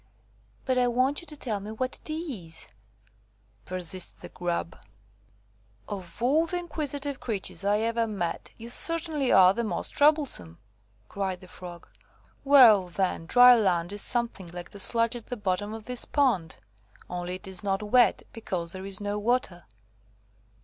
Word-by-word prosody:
"But 255 Hz, -1 st, +1 dB
I 250 Hz, -, +3 dB
want 255 Hz, +5 st, +1 dB
you 340 Hz, -, -14 dB
to 300 Hz, -, -9 dB
tell 220 Hz, -7 st, -3 dB
me 205 Hz, +2 st, -8 dB
what 255 Hz, +4 st, -3 dB
it -, -, -9 dB
is," 220 Hz, -, -6 dB, 1.0 s
persisted 185 Hz, 0 st, -3 dB
the -, -, -9 dB
Grub. 175 Hz, -1 st, -3 dB, 1.1 s
"Of 190 Hz, -4 st, -8 dB
all 305 Hz, +7 st, +3 dB
the 355 Hz, -, -2 dB
inquisitive 290 Hz, -5 st, -2 dB
creatures 205 Hz, -3 st, -3 dB
I 205 Hz, +2 st, +2 dB
ever 230 Hz, 0 st, 0 dB
met, 175 Hz, -6 st, -4 dB
you 230 Hz, +1 st, -8 dB
certainly 315 Hz, -1 st, +2 dB
are 185 Hz, 0 st, +7 dB
the 235 Hz, -, -2 dB
most 215 Hz, -, -2 dB
troublesome," 285 Hz, -, +1 dB, 0.5 s
cried 190 Hz, -, -3 dB
the 185 Hz, -, -13 dB
Frog. 175 Hz, -1 st, -11 dB, 0.6 s
"Well, 240 Hz, -9 st, +7 dB
then, 175 Hz, -2 st, -2 dB
dry 245 Hz, +3 st, +8 dB
land 185 Hz, -4 st, +1 dB
is 205 Hz, -, -6 dB
something 235 Hz, -6 st, -2 dB
like 175 Hz, +1 st, -9 dB
the 200 Hz, -, -10 dB
sludge 230 Hz, +3 st, +2 dB
at 235 Hz, -, -9 dB
the 245 Hz, -, -5 dB
bottom 205 Hz, +1 st, -2 dB
of 220 Hz, -1 st, -8 dB
this 250 Hz, -1 st, +1 dB
pond, 230 Hz, -, +1 dB, 0.5 s
only 180 Hz, 0 st, -4 dB
it 185 Hz, -, -8 dB
is 190 Hz, -1 st, -3 dB
not 195 Hz, 0 st, -1 dB
wet, 240 Hz, +3 st, +3 dB
because 180 Hz, -7 st, -4 dB
there 190 Hz, +1 st, -7 dB
is 195 Hz, 0 st, -1 dB
no 205 Hz, 0 st, -2 dB
water." 210 Hz, -6 st, -1 dB
210 Hz, 160 wpm, -27 LUFS, 185-255 Hz, 1.1 s, dry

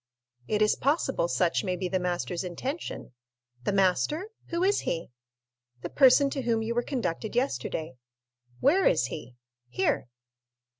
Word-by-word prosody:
"It 215 Hz, 0 st, +2 dB
is 210 Hz, -, +4 dB
possible 330 Hz, -, +1 dB
such -, -, +1 dB
may 185 Hz, -2 st, -1 dB
be 185 Hz, +1 st, -3 dB
the 185 Hz, +1 st, 0 dB
master's 180 Hz, 0 st, -2 dB
intention." 255 Hz, -, -5 dB, 0.5 s
"The -, -, +2 dB
master?—who 315 Hz, -, 0 dB
is 400 Hz, +2 st, +3 dB
he?" 165 Hz, -5 st, -3 dB, 0.7 s
"The -, -, -5 dB
person 275 Hz, +1 st, +6 dB
to 275 Hz, -, -2 dB
whom 230 Hz, -2 st, 0 dB
you 230 Hz, +1 st, -2 dB
were 240 Hz, -, +1 dB
conducted 235 Hz, -, -3 dB
yesterday." 160 Hz, -, -2 dB, 0.6 s
"Where 355 Hz, +8 st, +4 dB
is 155 Hz, -7 st, +3 dB
he?" 120 Hz, +1 st, -8 dB, 0.3 s
"Here." 125 Hz, 0 st, 0 dB
225 Hz, 140 wpm, -28 LUFS, 180-285 Hz, 0.7 s, person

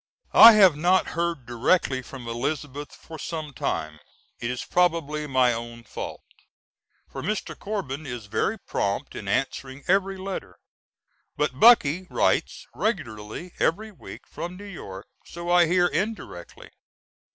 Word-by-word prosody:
I 230 Hz, -, +11 dB
have 190 Hz, -7 st, +6 dB
not 175 Hz, +5 st, +2 dB
heard 170 Hz, -6 st, -2 dB
directly 130 Hz, +3 st, +1 dB
from 125 Hz, -1 st, -10 dB
Elizabeth 145 Hz, +4 st, -4 dB
for 160 Hz, -1 st, -11 dB
some 155 Hz, -3 st, -5 dB
time; 75 Hz, -, -3 dB, 0.4 s
it 120 Hz, -, -3 dB
is 125 Hz, 0 st, -4 dB
probably 160 Hz, -4 st, +1 dB
my 130 Hz, -3 st, +3 dB
own 115 Hz, 0 st, -7 dB
fault, 105 Hz, -, -7 dB, 0.8 s
for -, -, -7 dB
Mr. 215 Hz, 0 st, -3 dB
Corbin 155 Hz, -9 st, -5 dB
is 120 Hz, -4 st, -6 dB
very 110 Hz, -, -1 dB
prompt 100 Hz, -, -3 dB
in 100 Hz, -, -7 dB
answering 135 Hz, +5 st, -2 dB
every 195 Hz, +1 st, +2 dB
letter; 190 Hz, 0 st, -6 dB, 0.8 s
but 150 Hz, -3 st, -1 dB
Bucky 185 Hz, -6 st, +6 dB
writes -, -, 0 dB
regularly 145 Hz, -, -4 dB
every 215 Hz, +6 st, 0 dB
week 195 Hz, -, -12 dB
from 175 Hz, +1 st, -7 dB
New 200 Hz, -, -10 dB
York, 100 Hz, -, -9 dB, 0.2 s
so 170 Hz, 0 st, -6 dB
I 175 Hz, -1 st, +6 dB
hear 175 Hz, +1 st, +3 dB
indirectly. 190 Hz, -, -4 dB
150 Hz, 135 wpm, -25 LUFS, 125-185 Hz, 0.8 s, I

